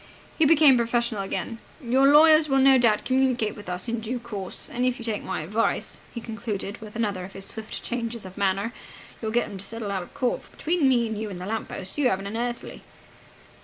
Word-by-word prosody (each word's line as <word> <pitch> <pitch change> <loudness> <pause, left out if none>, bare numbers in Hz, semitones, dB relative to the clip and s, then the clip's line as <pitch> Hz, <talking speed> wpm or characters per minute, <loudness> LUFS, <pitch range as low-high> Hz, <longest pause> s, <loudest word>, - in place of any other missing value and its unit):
He 320 - +6
became 295 -4 +7
professional 235 -2 0
again. 225 +4 -4 0.2
"Your 265 0 +3
lawyers 310 +1 +7
will 270 - +3
no 265 0 +6
doubt 225 -3 +3
communicate 255 -5 +1
with 205 -3 -9
us 180 +4 -2
in 235 0 -1
due 230 +3 -3
course. 210 -6 -5
And, 245 - -3
if 255 0 +1
you 230 - -8
take 220 -3 -1
my 190 - -3
advice," 210 +8 -1
he 235 - -6
concluded, 220 -2 -5
with 215 -1 -10
another 205 -5 -1
of 190 +1 -9
his 195 0 -5
swift 220 +1 -6
changes 235 -3 -4
of 185 0 -10
manner, 200 +3 0 0.5
"you'll 220 - -2
get 240 +2 +1
'em 195 - -8
to - - -3
settle 225 -1 -4
out 195 -2 -1
of 175 - -12
court, 255 -4 0
for, - - -18
between 320 -4 +1
me 240 -3 +3
and 220 -1 -4
you 220 - -3
and 185 -3 -7
the 180 - -6
lamp 220 +2 -3
post, 190 +9 -6
you 265 -4 +4
haven't 195 -1 -1
an 200 +2 -5
earthly!" 240 +1 -4
230 Hz, 230 wpm, -25 LUFS, 205-250 Hz, 0.5 s, became